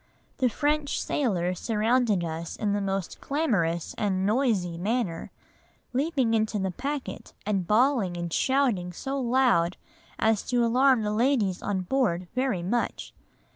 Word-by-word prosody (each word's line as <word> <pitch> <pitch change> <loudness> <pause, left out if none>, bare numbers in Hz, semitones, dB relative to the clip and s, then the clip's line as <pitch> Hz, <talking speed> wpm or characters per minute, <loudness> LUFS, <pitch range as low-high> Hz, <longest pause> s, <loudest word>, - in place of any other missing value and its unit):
The 255 -2 +3
French 295 +3 0
sailors 180 -9 -1
surrounded 225 -3 +1
us 165 0 -4
in 205 -2 -1
the 205 - 0
most 195 -2 -3
clamorous 195 - 0
and 190 -2 0
noisy 210 -6 +1
manner, 195 -2 -2 0.6
leaping 265 -3 +1
into 220 -1 +1
the 190 -1 -1
packet 275 +7 -5
and 195 -4 -1
bawling 220 -5 +2
and 170 -1 -4
shouting 245 -10 +1
so 270 +9 -3
loud 240 -9 +2 0.4
as 220 -2 +2
to 245 -1 +2
alarm 255 0 +4
the 210 0 -1
ladies 220 -5 +1
on 195 -2 -1
board 185 -4 0
very 255 -8 0
much. 235 +7 -2
220 Hz, 135 wpm, -27 LUFS, 185-255 Hz, 0.6 s, alarm